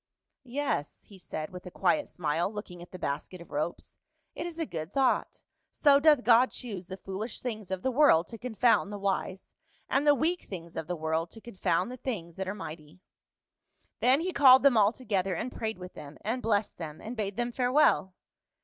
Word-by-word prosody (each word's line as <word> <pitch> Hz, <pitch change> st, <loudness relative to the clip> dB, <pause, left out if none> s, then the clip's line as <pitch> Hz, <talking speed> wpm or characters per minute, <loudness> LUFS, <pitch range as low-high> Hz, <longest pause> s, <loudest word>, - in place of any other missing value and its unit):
"Yes," 270 Hz, -, -2 dB
he 195 Hz, -2 st, -16 dB
said 155 Hz, -3 st, -6 dB
with 180 Hz, 0 st, -9 dB
a -, -, -5 dB
quiet 295 Hz, -, +1 dB
smile, 165 Hz, +3 st, -1 dB
looking 205 Hz, -5 st, -8 dB
at 175 Hz, -, -11 dB
the 185 Hz, -, -7 dB
basket 155 Hz, +3 st, -4 dB
of 170 Hz, -, -13 dB
ropes, 155 Hz, +4 st, -4 dB, 0.2 s
" -, -, -48 dB
it 345 Hz, -, -4 dB
is 340 Hz, -1 st, -8 dB
a 330 Hz, -, -1 dB
good 165 Hz, -3 st, -6 dB
thought; 270 Hz, -2 st, +1 dB, 0.3 s
so 280 Hz, -2 st, +4 dB
doth 295 Hz, -3 st, +5 dB
God 240 Hz, +2 st, +6 dB
choose 200 Hz, -8 st, -7 dB
the 190 Hz, -, -7 dB
foolish 195 Hz, +4 st, -6 dB
things 220 Hz, -6 st, -5 dB
of 190 Hz, -1 st, -3 dB
the 260 Hz, -, +1 dB
world 255 Hz, -, +5 dB
to 230 Hz, -, -9 dB
confound 240 Hz, -3 st, +2 dB
the 205 Hz, -, -4 dB
wise, 195 Hz, -1 st, -3 dB, 0.3 s
and 280 Hz, +2 st, +1 dB
the 290 Hz, -, +7 dB
weak 335 Hz, +5 st, 0 dB
things 170 Hz, -3 st, -8 dB
of 155 Hz, -, -4 dB
the 180 Hz, -, -2 dB
world 160 Hz, +1 st, -1 dB
to 225 Hz, -, -11 dB
confound 195 Hz, -3 st, -1 dB
the 255 Hz, -, -7 dB
things 175 Hz, -11 st, -5 dB
that 190 Hz, 0 st, -3 dB
are 195 Hz, -, -3 dB
mighty." 155 Hz, -4 st, -9 dB, 1.0 s
Then 260 Hz, +5 st, +4 dB
he 365 Hz, +2 st, -2 dB
called 265 Hz, -3 st, +7 dB
them 280 Hz, -3 st, +6 dB
all 210 Hz, -1 st, +5 dB
together, 195 Hz, -7 st, -1 dB
and 250 Hz, -, -3 dB
prayed 220 Hz, -3 st, -3 dB
with 180 Hz, 0 st, -9 dB
them, 145 Hz, 0 st, -10 dB
and 235 Hz, +5 st, -2 dB
blessed 210 Hz, -4 st, 0 dB
them, 155 Hz, -2 st, -6 dB
and 230 Hz, +3 st, -7 dB
bade 205 Hz, -2 st, -3 dB
them 240 Hz, 0 st, -1 dB
farewell. 250 Hz, -7 st, +2 dB
205 Hz, 205 wpm, -29 LUFS, 180-250 Hz, 1.0 s, the